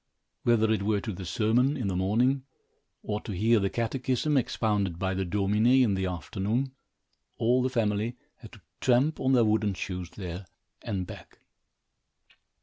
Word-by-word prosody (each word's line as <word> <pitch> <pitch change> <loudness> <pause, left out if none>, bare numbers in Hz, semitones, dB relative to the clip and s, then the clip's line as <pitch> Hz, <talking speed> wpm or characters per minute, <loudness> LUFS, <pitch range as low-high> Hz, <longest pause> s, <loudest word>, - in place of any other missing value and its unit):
Whether 110 -2 +3
it 110 -3 +1
were 105 +1 +1
to 110 +1 -5
the 90 0 -7
sermon, 120 +9 +2
in 120 -6 -2
the 95 - -1
morning, 120 +9 +2 0.6
or 105 0 -3
to 105 - -6
hear 110 +5 +3
the 100 -1 0
catechism 130 +5 -1
expounded 105 -8 0
by 95 +1 -1
the 95 +1 -1
Domine, 105 +4 +1 0.2
in 110 -5 +2
the 95 -1 -1
afternoon, 95 - -2 0.7
all 120 +3 +3
the 130 - +1
family 115 -1 -1 0.2
had - - -13
to - - -14 0.2
tramp 130 +5 +2
on 130 0 +2
their 120 -3 +5
wooden 105 -2 +1
shoes 90 -2 -5
there 90 -1 -7 0.3
and 95 -2 -3
back. - - -11
110 Hz, 160 wpm, -28 LUFS, 95-120 Hz, 0.7 s, their